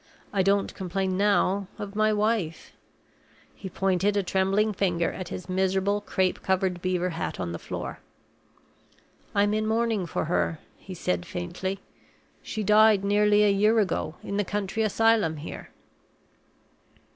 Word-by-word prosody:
I 195 - +2
don't 195 +1 +1
complain 190 0 -2
now 200 -1 +2
of 205 0 -7
my 215 0 +3
wife." 210 -6 -1 0.8
He 190 - -8
pointed 195 +2 +1
a 200 - +1
trembling 195 +4 +1
finger 175 -4 0
at 185 - -6
his 185 - -7
miserable 190 +2 +1
crape 190 -3 -1
covered 185 -2 0
beaver 180 0 0
hat 165 - -4
on 85 -2 -3
the 85 - -5
floor. - - -6 1.4
"I'm 205 +1 +3
in 215 0 0
mourning 225 -4 0
for 160 - -2
her," 165 0 0 0.2
he 190 - -10
said, 90 - -1
faintly. 190 - -4 0.6
"She 215 - -4
died 210 0 +5
nearly 210 +1 +4
a 205 - +4
year 210 +3 +3
ago, 190 -6 0
in 200 - -3
the 205 - +2
county 205 +2 -2
asylum 220 -6 +2
here." 150 - -8
195 Hz, 145 wpm, -26 LUFS, 185-210 Hz, 1.4 s, died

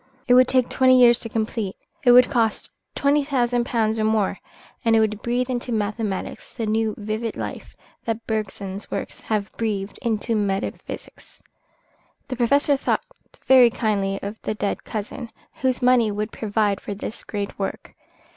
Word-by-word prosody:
It 245 - +5
would 255 0 +7
take 255 -2 +3
twenty 255 -1 +4
years 240 -1 +6
to 230 - -6
complete, 220 -3 -2 0.3
it 245 - +6
would 250 +1 +8
cost 230 -5 0 0.2
twenty 285 +1 +3
thousand 245 -3 0
pounds 225 -2 +1
or - - +1
more, 215 -3 +1 0.4
and 230 -1 +4
it - - +5
would 215 -1 0
breathe 245 +1 0
into 245 -1 -3
mathematics 210 -2 -3
the 230 - -2
new, 220 0 0
vivid 215 +2 -3
life - - -6 0.3
that 225 0 -3
Bergson's 200 -2 -4
works - - -5
have 210 -2 -2
breathed 210 -3 -2
into 230 -1 0
metaphysics. 200 -2 -4 0.9
The 255 - -2
Professor 280 +4 +3
thought 270 - 0 0.4
very 255 -2 +7
kindly 200 -4 -1
of 205 +2 -6
the 215 - -3
dead 205 -1 -2
cousin, 230 +3 -5 0.3
whose 260 -1 +1
money 245 -3 +5
would 210 +1 -3
provide 205 -2 0
for 205 - -5
this 210 +2 -6
great 205 -1 -5
work. 195 - -4
225 Hz, 160 wpm, -23 LUFS, 210-245 Hz, 0.9 s, would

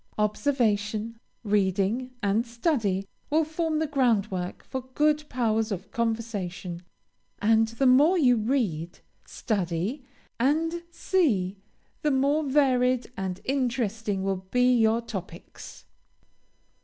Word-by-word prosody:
Observation, 215 -1 0 0.2
reading, 205 +4 +1
and 205 +3 +2
study, 230 - -1 0.2
will 315 +2 +3
form 315 0 -1
the 315 - +1
groundwork 220 -10 0
for 260 - -5
good 300 0 +3
powers 225 -3 0
of 190 0 -5
conversation, 205 -7 -3 0.6
and 225 +1 +3
the 230 +4 -1
more 290 +8 +5
you 255 -7 +5
read, 210 - -1 0.3
study, 200 - -2 0.4
and 325 +6 +1
see, 220 - 0 0.4
the 300 - +1
more 280 +2 +2
varied 255 -3 +2
and 190 -1 -4
interesting 230 -6 -1
will 195 -1 0
be 250 +2 +3
your 225 0 +3
topics. 185 -6 -9
230 Hz, 105 wpm, -26 LUFS, 200-270 Hz, 0.6 s, more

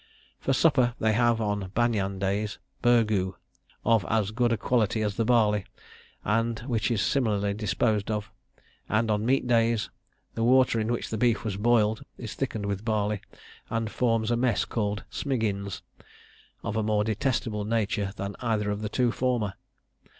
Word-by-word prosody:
For - - -1
supper, 130 -4 +3
they 110 0 +2
have, 120 0 +3
on 105 -3 -1
banyan 105 -5 +1
days, 100 +2 -1 0.2
burgoo, 110 -6 +3 0.5
of 115 -3 +4
as 110 -2 +1
good 120 +1 +1
a 115 - +2
quality 110 0 +1
as 105 -1 0
the 115 - 0
barley, 105 -4 +3 0.6
and 115 +1 +1
which 120 -3 -1
is 110 -4 +1
similarly 105 -6 +1
disposed 105 +1 0
of; 105 0 -3 0.6
and 110 +1 +2
on 105 +2 0
meat 135 +1 +2
days, 115 -3 +2 0.4
the 115 - -2
water 130 -1 +4
in 110 +2 0
which 120 - -3
the 110 - -2
beef 120 -1 +2
was 105 -3 -2
boiled 110 0 +2
is 115 -4 -6
thickened 110 -6 -3
with 100 0 -3
barley, 105 -2 0 0.5
and 115 -1 -2
forms 115 -2 +1
a - - +3
mess 120 -2 +1
called 105 -2 -2
'smiggins,' 105 -8 -2 0.8
of 115 -2 -3
a 110 - +1
more 105 -1 +1
detestable 110 -1 -1
nature 105 -2 0
than 100 0 -5
either 110 -4 0
of 105 +1 -3
the 105 - -3
two 120 +1 +1
former! 120 -6 0
110 Hz, 165 wpm, -27 LUFS, 105-120 Hz, 0.8 s, of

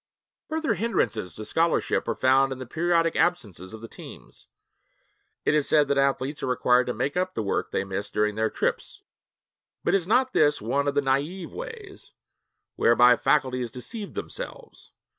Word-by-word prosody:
Further 315 -5 0
hindrances 160 - -1
to 110 - -7
scholarship 165 +6 +1
are 115 - -1
found 135 +1 +3
in 130 - -4
the 130 - -7
periodic 165 +4 +1
absences 105 - -1
of 110 0 -10
the 115 - -8
teams. - - -13 1.0
It - - +3
is 150 -2 +2
said 150 -2 +4
that 140 - +1
athletes 140 +1 0
are - - -2
required 125 0 +2
to 125 - -1
make 130 +5 -2
up 185 +1 -1
the 110 - -1
work 100 - -1
they - - -1
miss 100 +1 -4
during 105 0 0
their 110 +1 0
trips, - - -3 0.8
but - - +1
is 185 -3 +1
not 255 +4 +2
this 150 -1 +3
one 135 +7 -1
of 140 - 0
the 145 - +3
naïve 145 +7 -1
ways 455 -5 -9 0.6
whereby 120 +1 +6
faculties 125 -3 +1
deceive 200 - -8
themselves? - - -8
140 Hz, 170 wpm, -26 LUFS, 120-175 Hz, 1.0 s, whereby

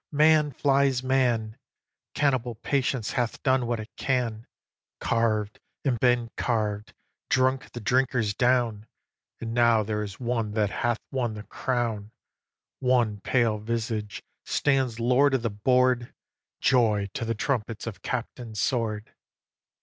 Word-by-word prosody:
Man 155 0 +4
flies 135 -1 +2
man; 120 -5 +1 0.6
Cannibal 130 -5 +1
patience 130 -1 -1
hath 120 -2 -2
done 130 -2 +2
what 120 -1 -1
it 110 +1 -8
can 120 -4 -1 0.5
Carv'd, 110 -2 0 0.3
and 125 -4 +1
been 120 -1 +2
carv'd, 105 -3 -2 0.3
drunk 130 +1 +1
the 120 - -6
drinkers 125 -2 +1
down, 120 -3 +1 0.5
And 115 0 -5
now 115 -2 +4
there 105 0 -2
is 100 -2 -6
one 115 -4 -1
that 105 -2 +1
hath 120 -1 0
won 120 -5 -1
the 105 - -7
crown: 115 -5 -2 0.7
One 120 -5 +2
pale 115 -3 +1
visage 110 -1 -3 0.2
stands 135 -5 +1
lord 130 +4 +3
of 125 - -1
the 115 - 0
board 125 +3 +2 0.5
Joy 105 -6 +2
to - - -3
the 115 0 -1
trumpets 115 -2 -2
of 115 -4 -7
Captain 120 -2 -5
Sword! 110 -1 -1
120 Hz, 130 wpm, -26 LUFS, 110-130 Hz, 0.7 s, Man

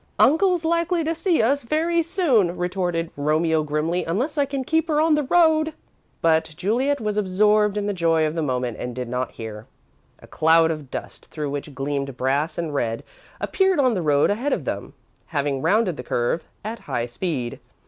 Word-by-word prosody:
"Uncle's 350 +2 +3
likely 335 +1 +1
to 320 +1 0
see 330 - +1
us 280 +5 +2
very 325 +7 +1
soon," 290 - +1
retorted 175 -2 -2
Romeo 155 +2 +1
grimly, 155 +4 -1
"unless 240 - -1
I 285 -2 +1
can 275 -1 -3
keep 320 +4 +1
her 305 -2 +1
on 315 0 +4
the 300 - +3
road." 315 +1 +3 0.5
But 160 -1 +2
Juliet 250 +10 +1
was 210 -2 -2
absorbed 210 +1 +2
in 205 - -1
the 205 - -1
joy 165 -3 +2
of 155 - -1
the 165 - -2
moment 125 -5 -2
and 125 -1 -5
did 125 -1 -4
not 125 +1 -3
hear. 110 -1 -8 0.5
A - - -16
cloud 165 +1 +3
of 150 -4 -6
dust, - - -7
through 150 -3 -4
which 145 0 -5
gleamed 140 -1 -3
brass 140 +5 0
and 165 -3 -3
red, 115 -5 -1 0.4
appeared 380 -4 +1
on 255 -3 +3
the 185 - -1
road 145 0 +3
ahead 245 +8 -1
of - - -3
them, - - -4 0.3
having 145 -3 -1
rounded 200 -4 +2
the 125 - -6
curve 120 +7 -1 0.2
at 225 +1 -4
high 120 - -1
speed. 125 - -4
175 Hz, 190 wpm, -23 LUFS, -, 0.5 s, on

